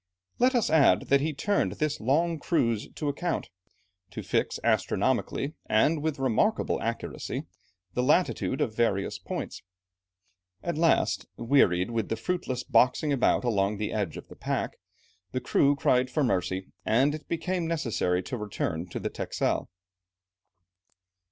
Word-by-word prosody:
Let 255 +2 +4
us 230 -9 +2
add 155 -3 +4
that 140 0 +5
he 155 +2 0
turned 200 +8 0
this 150 -1 -1
long 160 +7 +1
cruise 115 - 0
to 150 - -3
account, 165 +5 -2 0.6
to - - -7
fix - - 0
astronomically, 140 +3 0
and 145 +8 +3
with 155 -1 -1
remarkable 135 - +1
accuracy, 115 +1 -3 0.5
the 125 - 0
latitude 145 -1 +1
of 110 - -1
various 100 -5 0
points. - - -5 1.0
At 170 - -2
last, 165 +1 +2
wearied 115 -7 +3
with 115 -2 -2
the - - 0
fruitless 130 0 -2
boxing 140 +4 +3
about 130 - +2
along 105 -3 +1
the 105 0 -3
edge 100 -7 -2
of - - -10
the - - -12
pack, - - -3 0.5
the 130 - 0
crew 140 +3 +3
cried 125 -2 +2
for 150 +2 0
mercy, 95 -4 -1
and 130 +9 +3
it 155 0 -7
became 170 +1 -1
necessary 115 - 0
to 130 - -4
return 95 -5 -3
to - - -4
the - - -3
Texel. - - -2
130 Hz, 145 wpm, -28 LUFS, 110-160 Hz, 1.0 s, that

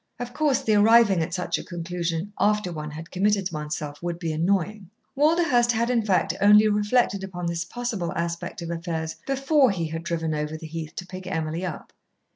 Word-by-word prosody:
Of 245 0 -6
course 295 -3 +1
the 220 - +2
arriving 210 -3 +5
at 160 - -2
such 180 0 -2
a - - -7
conclusion, 175 +1 -4
after 210 -3 +2
one 150 -1 -5
had 160 +2 -9
committed 195 0 +1
oneself, 150 -1 -5
would 170 -1 -3
be 170 -2 -3
annoying. 190 +4 0 0.3
Walderhurst 290 -5 +3
had, 235 +2 +1
in 235 -2 +2
fact, 195 -3 +1
only 210 +1 +7
reflected 210 -1 +1
upon 180 -2 -5
this 170 0 -1
possible 225 -8 -3
aspect 170 +1 -3
of 170 - -4
affairs 165 -1 -4
before 275 0 +3
he 170 -5 -2
had 165 +1 -4
driven 165 -1 -2
over 150 +1 -3
the 160 - -10
heath 160 0 -6
to 180 - -5
pick 185 0 -9
Emily 165 -1 -2
up. 175 -5 -6
180 Hz, 190 wpm, -25 LUFS, 165-215 Hz, 0.3 s, only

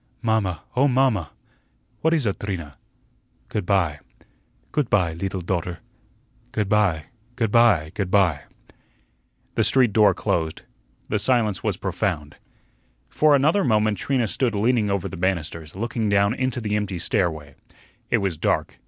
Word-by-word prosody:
"Mamma, 110 -6 0
oh, 135 +3 +4
mamma!" 125 - +2 0.7
"What 160 - +2
is 150 -6 0
ut, 100 - -1
Trina?" 85 -8 -5 0.7
"Good 105 -5 -3
by." 85 -7 +1 0.7
"Goot 145 -5 0
py, 90 -5 +2
leetle 95 +2 -4
daughter." 85 0 -2 0.7
"Good 105 -2 -1
by, 100 -7 +2 0.3
good 115 -4 -1
by, 105 -10 +4
good 100 -3 -2
by." 90 -5 +2 1.1
The - - +1
street 125 -5 +3
door 105 -4 +5
closed. 80 -3 -2 0.5
The 105 - 0
silence 110 -5 +1
was - - -1
profound. 75 0 -3 0.7
For 150 -1 +4
another 155 +9 +3
moment 110 -5 +2
Trina 125 0 0
stood 120 +1 0
leaning 110 0 +2
over 100 -3 -1
the 95 - -8
banisters, 85 -3 -2
looking 115 +1 -2
down 100 +1 +3
into 130 -1 -2
the 105 -3 -2
empty 100 -3 -2
stairway. 80 -5 -1 0.6
It - - +3
was 95 -5 -1
dark. - - -1
100 Hz, 145 wpm, -23 LUFS, 90-115 Hz, 1.1 s, door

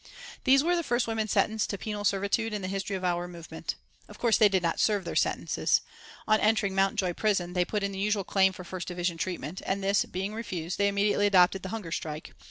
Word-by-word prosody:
These 270 +1 +5
were 350 +2 +2
the 345 - +1
first 245 -5 0
women 225 -1 -1
sentenced 220 +1 +1
to 200 - -2
penal 210 +1 -4
servitude 200 +3 0
in 200 - -4
the - - -2
history 195 +1 -3
of 185 - -5
our 175 -1 0
movement. 170 -2 -6 0.3
Of - - -13
course 235 -3 +3
they 215 -2 +6
did 190 -2 +1
not 165 - 0
serve 205 -4 +2
their - - -4
sentences. - - +1 0.5
On 215 0 +4
entering 210 -2 +2
Mountjoy 195 -2 +1
Prison 185 -3 0
they 180 -1 +2
put 210 +2 -2
in 200 - -1
the 190 - -6
usual 205 0 +1
claim 190 0 +3
for 185 -1 -9
first 180 0 -6
division 175 -1 -2
treatment, 175 -1 -4
and 195 +1 -2
this 200 +1 +3
being 195 +3 -4
refused, 185 -6 -4
they 200 - +4
immediately 205 0 +2
adopted 190 -1 +4
the 190 - -6
hunger 205 -6 -5
strike. 155 -1 -5
195 Hz, 225 wpm, -28 LUFS, 180-210 Hz, 0.5 s, they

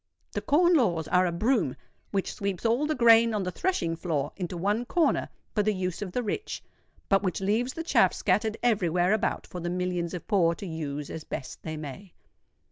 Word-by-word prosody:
The - - -3
Corn 345 +4 +4
Laws 175 - +2
are 180 0 +4
a - - -1
broom 210 - +1 0.3
which 195 -2 -1
sweeps 200 0 -3
all 240 +6 +2
the 310 - 0
grain 230 -2 +6
on 205 - 0
the 180 - -2
threshing 175 - -1
floor 155 -4 -2
into 180 -2 -4
one 205 +6 0
corner 325 +7 +1 0.2
for 210 - +2
the 210 0 +1
use 185 -1 -3
of 195 -3 -4
the 250 +6 -1
rich, 235 - -4 0.4
but 195 -1 +3
which 185 -3 -1
leaves 220 +6 0
the 330 - -4
chaff 335 - +4
scattered 220 0 0
every 210 -8 +2
where 180 +4 +2
about 220 +1 0
for 180 - -7
the 175 0 -3
millions 180 -1 -2
of 175 - -7
poor 175 -6 +3
to 200 - -8
use 150 -4 -4
as 160 - -6
best 135 - -6
they 155 -1 -5
may. 155 +5 -8
190 Hz, 210 wpm, -28 LUFS, 170-230 Hz, 0.4 s, grain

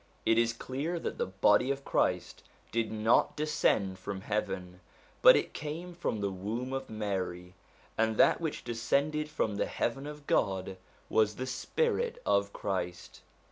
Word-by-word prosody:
It 115 0 +4
is 115 0 +3
clear 135 +8 -3
that - - -4
the - - 0
body 105 +6 +3
of 140 0 -2
Christ - - 0 0.3
did 115 -1 0
not 110 +1 +2
descend 110 -11 +1
from 100 -2 -5
heaven, 95 -4 -3 0.4
but - - +10
it - - 0
came 165 +4 -5
from 170 -10 -2
the 100 -1 0
womb 110 +8 -4
of 135 0 -4
Mary; 95 -4 -3 0.5
and 110 -1 +2
that - - +5
which 160 -3 -3
descended 140 +6 0
from 110 -9 -1
the - - 0
heaven 135 +4 -2
of 150 -1 -9
God 95 -4 0 0.3
was 105 -1 +2
the 130 - -3
spirit 470 - -1
of 100 0 +2
Christ. 90 -3 -4
115 Hz, 155 wpm, -31 LUFS, 100-140 Hz, 0.5 s, but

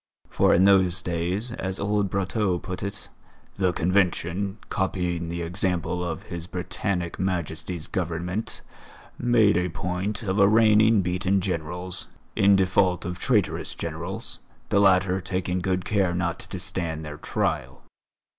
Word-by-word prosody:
For - - +3
in 90 - +5
those 95 -2 +4
days, 90 +7 -2
as 95 -6 -3
old 105 -1 +1
Brotteaux 95 0 0
put 90 +1 -6
it, 100 +1 -5 0.5
"the 95 -2 +2
Convention, 90 +2 0
copying 90 -3 -1
the 85 0 -3
example 90 0 -1
of 85 +1 -4
His 85 -4 -7
Britannic 90 -1 -3
Majesty's 85 -2 -2
Government, 90 +4 -3 0.6
made 115 -5 +4
a 90 0 0
point 90 +5 -3
of 100 0 0
arraigning 110 0 +5
beaten 90 +2 +1
Generals, 90 0 -3 0.3
in 100 0 +5
default 95 -1 +2
of 90 0 -4
traitorous 105 -5 0
Generals, - - -5 0.3
the 100 - +3
latter 95 -1 +4
taking 90 0 -2
good 95 -1 -1
care 95 -4 +1
not 85 -2 -1
to 95 - -7
stand 85 -4 -4
their 75 -1 -7
trial. - - -2
90 Hz, 135 wpm, -25 LUFS, 85-100 Hz, 0.6 s, in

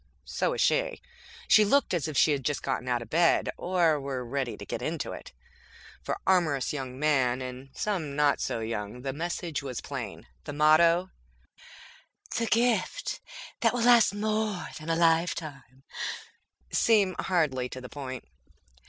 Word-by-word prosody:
So - - -1
was - - -1
she. - - +1 0.5
She 215 - +7
looked 275 +4 +2
as 165 -3 0
if 155 -3 -4
she 155 - +5
had 140 -2 -1
just 145 +1 -1
gotten 125 - -2
out 120 -1 0
of 115 - -17
bed, 170 +1 +3
or 170 -4 +2
were 135 -2 -4
ready 120 -3 -3
to - - -9
get - - -4
into - - -3
it. - - -9 0.7
For - - -3
amorous 160 -9 +2
young 130 -3 -5
men, 130 -4 +2
and 130 +1 -7
some 170 -9 -2
not 145 -1 +2
so 115 - -2
young, 110 +1 -5
the 135 -1 -2
message 170 0 -3
was 130 -4 -5
plain. - - -6 0.2
The 145 - -5
motto, 165 +4 +4 1.2
"The 230 - 0
Gift 235 - 0 0.4
That - - +2
Will 240 - 0
Last 240 -4 +6
More 215 -2 -1
Than 155 +1 -8
a 165 - +2
Lifetime", 160 -6 0 0.9
seemed 205 -5 +3
hardly 140 -9 0
to 130 - -7
the 125 - -8
point. 130 -2 -7
155 Hz, 160 wpm, -28 LUFS, 130-185 Hz, 1.2 s, She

